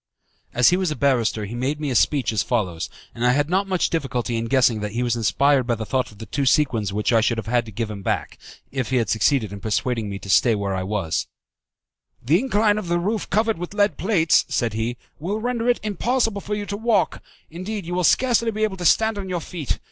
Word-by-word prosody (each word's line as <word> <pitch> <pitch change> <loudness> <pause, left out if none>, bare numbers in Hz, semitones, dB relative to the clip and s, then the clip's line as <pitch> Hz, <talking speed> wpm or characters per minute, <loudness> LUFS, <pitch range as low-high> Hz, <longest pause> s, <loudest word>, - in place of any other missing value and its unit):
As 125 +4 +4
he 180 - +3
was 185 -2 0
a 150 - -2
barrister 120 -7 +1
he 105 - -7
made 130 +5 -2
me 150 -3 -2
a - - -2
speech 135 0 +2
as 110 - +1
follows, 95 -10 -2 0.2
and 120 - -5
I 125 0 +4
had 145 +4 0
not 195 +2 +1
much 185 -2 0
difficulty 125 -7 -2
in 115 0 -1
guessing 120 -3 +3
that 105 0 -4
he 120 +2 -1
was 120 -1 0
inspired 135 +3 +2
by 120 - +1
the 110 0 -5
thought 130 +1 -1
of 105 - -17
the 110 - -8
two 135 +6 -2
sequins 120 -8 +2
which 105 +4 0
I 115 - +5
should 115 +1 +1
have 115 - -4
had 120 0 0
to - - -8
give 110 +1 -3
him 100 -2 -7
back, - - -3 0.3
if 130 -4 -2
he 130 - 0
had 115 -3 0
succeeded 110 -1 +1
in 100 - -7
persuading 110 +1 -1
me 100 - -4
to 100 - -11
stay 110 +5 +4
where 100 -1 -2
I 95 - -2
was: 95 -4 -2 0.9
"The 150 +9 +2
incline 215 -4 +2
of 185 - -6
the 175 0 +1
roof 205 +5 -2
covered 220 -3 +1
with 175 +3 -6
lead 205 -5 +2
plates," 180 -5 +3
said 115 -3 0
he, 115 +2 -2 0.2
"will 195 +8 -2
render 240 0 -1
it 245 - +2
impossible 215 +1 0
for 210 +2 -3
you 205 0 -4
to 200 +1 -4
walk, 225 0 +1 0.3
indeed 185 +3 -5
you 175 - -5
will 180 0 0
scarcely 235 - +3
be 215 0 -2
able 205 -3 -1
to 175 - -5
stand 220 +5 +3
on 190 -1 -6
your 180 -1 -1
feet. 160 -3 -4
135 Hz, 245 wpm, -22 LUFS, -, 0.9 s, I